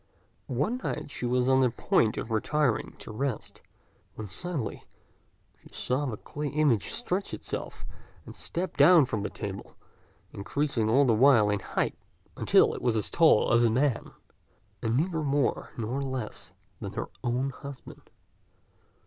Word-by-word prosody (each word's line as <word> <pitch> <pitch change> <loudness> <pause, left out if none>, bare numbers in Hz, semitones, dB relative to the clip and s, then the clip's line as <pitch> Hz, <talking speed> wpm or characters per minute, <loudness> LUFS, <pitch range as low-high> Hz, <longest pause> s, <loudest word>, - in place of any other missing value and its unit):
One 145 - -1
night 150 -1 -4
she 125 - -3
was 125 +1 +1
on 130 0 +4
the 130 - +4
point 115 -1 +1
of 115 - -4
retiring 125 +2 0
to - - -9
rest, 125 +1 -4 0.5
when 110 - -6
suddenly 130 - -4 0.8
she - - -18
saw 135 +3 0
the 110 -4 -4
clay 150 +7 -5
image 145 -7 +1
stretch 200 -5 -3
itself - - -6 0.4
and - - -10
step 180 +2 -4
down 175 -5 +7
from 110 -4 -3
the 105 - -2
table, 100 -2 -7 0.6
increasing 115 +2 -1
all 135 +5 +5
the 120 - +4
while 110 -3 +5
in 105 - 0
height, - - -2 0.4
until - - +4
it - - -6
was 120 -2 +1
as 110 - 0
tall 160 -9 +5
as 120 0 +5
a 115 - +4
man, 125 +1 +1 0.7
and 115 +1 0
neither 160 +1 0
more 140 -2 0
nor 120 +4 -2
less 130 -5 -5 0.3
than - - -6
her - - -4
own 125 +3 0
husband. 140 -1 -11
130 Hz, 155 wpm, -28 LUFS, 110-145 Hz, 0.8 s, down